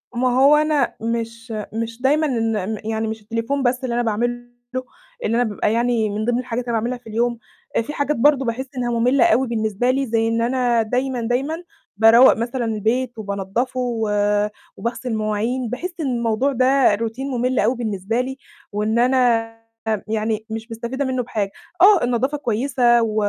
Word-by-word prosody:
ما 250 +1 +2
هو 285 +2 +7
أنا 300 -3 +1
مش 230 0 -4 0.2
مش 230 +1 -4
دايمًا 295 +4 +3
إن 225 -4 -1
ن - - -8
يعني 220 0 -1
مش 220 0 -5
التليفون 230 +6 -2
بس 250 +1 0
اللي 240 -2 -1
أنا 240 - +2
باعمله 240 +2 -2 0.8
إن 225 - +1
أنا 245 - +3
بيبقى 210 -1 -1
يعني 235 -2 +1
من 215 +2 -2
ضمن 245 0 +1
الحاجات 245 -1 -3
اللي 240 - -2
أنا 225 - +2
باعملها 245 +3 -2
في 225 - -11
اليوم، 235 +2 0 0.4
آآ - - +3
في 295 +6 -6
حاجات 285 +1 0
برضه 270 +1 +3
باحس 235 +3 -2
إنها 240 -1 -1
مُملة 250 +2 +4
أوي 255 +4 +3
بالنسبه 220 +1 0
لي 270 +1 0
زي 225 -1 +1
إن 230 0 0
أنا 245 -1 +2
دايمًا، 250 +3 -1
دايمًا، 270 +9 -1 0.3
باروّق 225 +4 +7
مثلًا 235 +2 -2
البيت 230 +3 -1
وبانضفه 205 +5 -3
و 230 -4 -1 0.7
وباغسل 235 +1 -4
المواعين. 220 +3 -1
باحس 350 +10 -4
إن 310 - -1
الموضوع 235 +1 0
ده 260 -3 +4
روتين 230 +5 -4
مُمل 255 0 0
أوي 230 +5 +2
بالنسبه 220 0 -1
لي 265 +1 -5 0.3
وإن 215 +2 0
أنا 235 -3 +2 0.5
يعني، 220 0 -1
مش 225 +1 -6
مستفيدة 235 +5 -3
منه 255 -1 -1
بحاجة. 205 -4 -2 0.3
آه، 395 -2 +7
النضافة 250 +4 0
كويسة، 240 -1 +2
و 220 -1 -2
235 Hz, 180 wpm, -21 LUFS, 225-255 Hz, 0.8 s, هو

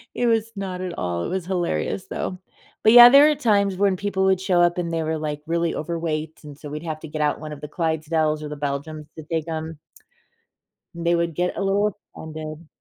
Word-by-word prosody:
It 245 - 0
was 225 -1 +1
not 190 -2 -5
at 185 -2 -4
all. 85 -1 -2
It - - -3
was 185 -1 -3
hilarious, 180 +1 -2
though. 185 - -4 0.4
But, 220 - +6
yeah, 240 0 +11
there 280 +3 +8
are 300 - +2
times 205 -7 +2
when 195 0 +2
people 195 -1 -1
would 190 -1 +2
show 185 -2 +2
up 175 0 +3
and 170 -1 -2
they 165 -1 -1
were, 160 0 -1
like, 150 -1 -4
really 170 0 -1
overweight, 160 -1 -3
and 145 -2 -11
so 150 0 -9
we'd 150 +2 -6
have 155 -2 -4
to - - -8
get 155 0 -4
out 150 - +1
one 155 0 -7
of 150 - -8
the 150 - -6
Clydesdales 160 -1 -1
or 150 - -6
the 150 - -5
Belgians 145 +2 -4
to 160 - -7
take 160 0 -3
'em. 160 -1 -5 1.2
And 170 0 -6
they 170 0 +3
would 170 -2 -1
get 180 +1 -1
a - - -1
little 205 +1 +1 0.2
offended. 155 0 -8
165 Hz, 230 wpm, -23 LUFS, 155-190 Hz, 1.2 s, yeah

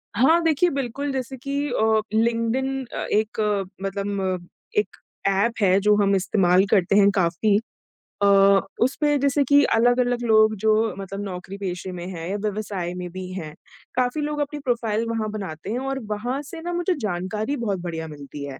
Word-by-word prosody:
हाँ, 315 +9 +5
देखिए, 325 +2 +3
बिल्कुल 275 0 -3
जैसे 265 0 -4
कि 280 +3 -2
अ, 220 -3 +2
लिंक्डइन 235 +4 0
अ, - - -4 0.2
एक 215 +1 0 0.4
मतलब 200 0 -2 0.6
एक 420 - +1 0.3
ऐप 200 +4 +2
है 190 -1 +4
जो 210 +1 +4
हम 200 0 +3
इस्तेमाल 190 -1 +3
करते 195 -1 +3
हैं 200 -1 +6
काफ़ी। 190 +3 +2 0.7
अ, - - +5 0.6
उसपे 295 +3 +1
जैसे 280 +1 +2
कि 285 +2 +5
अलग-अलग 245 +1 +2
लोग 215 -1 +4
जो 220 0 +5 0.2
मतलब 195 +1 -6
नौकरी-पेशे 185 -1 -5
में 175 -1 -6
हैं 170 -3 -6
या 200 - -1
व्यवसाय 200 -4 -3
में 180 -1 -5
भी 185 0 -7
हैं, 155 -5 -6 0.4
काफ़ी 250 +4 0
लोग 295 0 -2
अपनी 290 +1 -2
प्रोफ़ाइल 230 -2 0
वहाँ 225 -1 -1
बनाते 190 -5 -6
हैं 245 - -1
और 270 0 -3
वहाँ 245 +6 -3
से 325 +3 -9
ना, 350 +1 -4
मुझे 350 +2 +1
जानकारी 210 +6 -2
बहुत 205 -6 -2
बढ़िया 165 -2 -5
मिलती 145 -1 -9
है। 140 -2 -7
अ, - - -14
215 Hz, 170 wpm, -23 LUFS, 190-265 Hz, 0.7 s, हैं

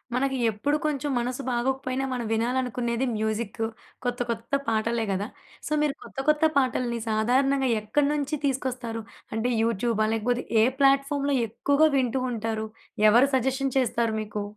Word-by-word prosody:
మనకి 270 +1 0
ఎప్పుడు 280 +8 0
కొంచెం 290 -1 -1
మనసు 250 +3 -2
బాగోకపోయినా, 255 +2 -1
మనం 245 -2 -3
వినాలనుకునేది 240 +1 0
మ్యూజిక్కు, 220 +1 -2 0.4
కొత్త 245 -1 -2
కొత్త 230 +3 -4
పాటలే 225 +1 0
గదా! 195 +2 -1 0.4
సో, - - -7
మీరు 295 -2 +1
కొత్త - - -9
కొత్త 305 +1 +4
పాటల్ని, 250 -3 +1
సాధారణంగా 260 +5 +2
ఎక్కడి 280 +7 +1
నుంచి 295 +1 -1
తీసుకొస్తారు? 255 -4 -2 0.3
అంటే 230 +3 0
యూట్యూబా? 230 -1 +1
లేకపోతే 240 +3 0 0.2
ఏ - - +6 0.2
ప్లాట్ఫార్మ్‌లో 275 +1 +3
ఎక్కువగా 285 +7 +3
వింటూ 255 0 +1
ఉంటారు? 220 -1 -2 0.4
ఎవరు 240 +6 +5
సజెషన్ 265 +1 0
చేస్తారు 235 -3 0
మీకు? 210 -1 -4
245 Hz, 135 wpm, -26 LUFS, 225-270 Hz, 0.4 s, ఏ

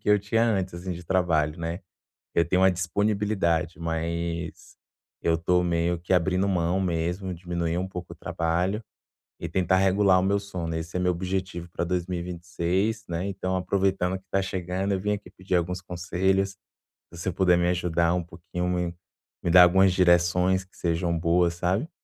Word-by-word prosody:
que - - -5
eu 105 - +6
tinha 115 +3 +1
antes, 95 -5 0
assim, 90 +1 -5
de 85 +1 -8
trabalho, 85 -3 +1
né. 85 +3 -3 0.5
Eu 85 - +3
tenho 90 +1 +3
a 95 - +6
disponibilidade, 90 -3 0
mas 85 0 -3 0.5
eu 85 - +3
estou 90 +2 +2
meio 85 0 0
que 85 +2 -3
abrindo 90 +2 +2
mão 90 0 +1
mesmo, 90 +2 -1
diminuir 85 -1 -2
um 95 - -1
pouco 90 -2 -7
o - - -10
trabalho 90 +6 -1 0.6
e 85 - -5
tentar 95 +2 +2
regular 95 0 +4
o - - +1
meu 100 +1 +2
sono, 90 -5 -5
esse 80 +2 -4
é - - 0
meu 90 0 +2
objetivo 90 -1 -3
pra 85 - -2
2026, 90 +4 -2
né. 85 +3 -2
Então 95 -1 -2
aproveitando 95 0 0
que 95 - -26
tá 95 - +1
chegando, 95 +1 -2
eu 95 - 0
vim 105 +1 0
aqui 100 -3 -5
pedir 95 -1 -5
alguns 90 +1 -1
conselhos, 95 +2 0 0.6
se 85 - -10
você 90 - -2
puder 90 -1 +3
me 85 0 +2
ajudar 85 -1 +1
um 90 - 0
pouquinho, 90 +1 -5
me 90 -1 -1 0.5
me 85 - 0
dar 90 +1 +9
algumas 95 +1 +5
direções 90 +1 +3
que 95 - -26
sejam 85 0 0
boas, 85 0 +2
sabe. 95 - -1
90 Hz, 175 wpm, -26 LUFS, 85-95 Hz, 0.6 s, dar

